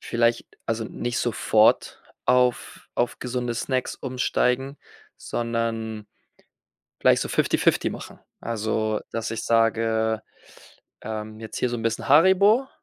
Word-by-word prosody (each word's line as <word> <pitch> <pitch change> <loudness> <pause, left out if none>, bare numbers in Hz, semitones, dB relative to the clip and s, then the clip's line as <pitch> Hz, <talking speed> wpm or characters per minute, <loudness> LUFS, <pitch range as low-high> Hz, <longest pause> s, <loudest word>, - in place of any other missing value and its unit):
vielleich 115 0 +1 0.2
also, 115 0 -2
nicht 120 +2 -3
sofort 110 -2 +2 0.2
auf 125 -1 +1
auf 120 0 -1
gesunde 125 -1 -3
Snacks 130 +2 -2
umsteigen, 130 +1 -1 0.4
sondern 115 -2 -3 0.9
vielleicht - - +4
so - - -4
fifty-fifty - - +2
machen. - - -9 0.2
Also, 110 -1 -1
dass 115 -1 -3
ich 115 -1 -4
sage, 115 -1 +1 0.8
ähm, 110 0 -6
jetzt 110 - -8
hier 125 - 0
so 120 - -2
'n 115 - -6
bisschen 115 +3 -2
Haribo 190 - +5
115 Hz, 115 wpm, -24 LUFS, 110-125 Hz, 0.9 s, Haribo